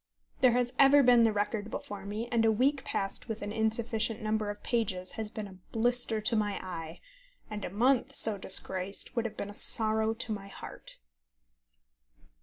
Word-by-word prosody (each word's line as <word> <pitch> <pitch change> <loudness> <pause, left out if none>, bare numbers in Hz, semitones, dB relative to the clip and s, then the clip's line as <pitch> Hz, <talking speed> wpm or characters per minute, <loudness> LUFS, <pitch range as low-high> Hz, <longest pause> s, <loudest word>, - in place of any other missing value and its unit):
There 250 -2 +5
has 245 0 0
ever 280 +1 +7
been 245 -1 +6
the 225 - +3
record 210 +1 -2
before 200 -2 -7
me, 215 +3 -4
and 230 -2 +2
a 225 - +4
week 265 +5 +1
passed 195 +4 -3
with 220 -1 -4
an 205 - -4
insufficient 220 0 0
number 215 -1 -1
of 205 0 -7
pages 190 -6 -1
has 220 -1 -4
been 215 -2 -6
a 190 -1 -14
blister 240 -1 +1
to 215 +2 0
my 210 -2 0
eye, 165 -3 -7 0.5
and 210 -1 -5
a - - -3
month 245 +7 +1
so 215 -3 +3
disgraced 190 +3 +1
would 235 -1 0
have 230 - -5
been 205 - -5
a - - -14
sorrow 220 0 +2
to 225 0 -3
my 200 -2 -5
heart. 200 - -9
220 Hz, 185 wpm, -30 LUFS, 205-235 Hz, 0.5 s, ever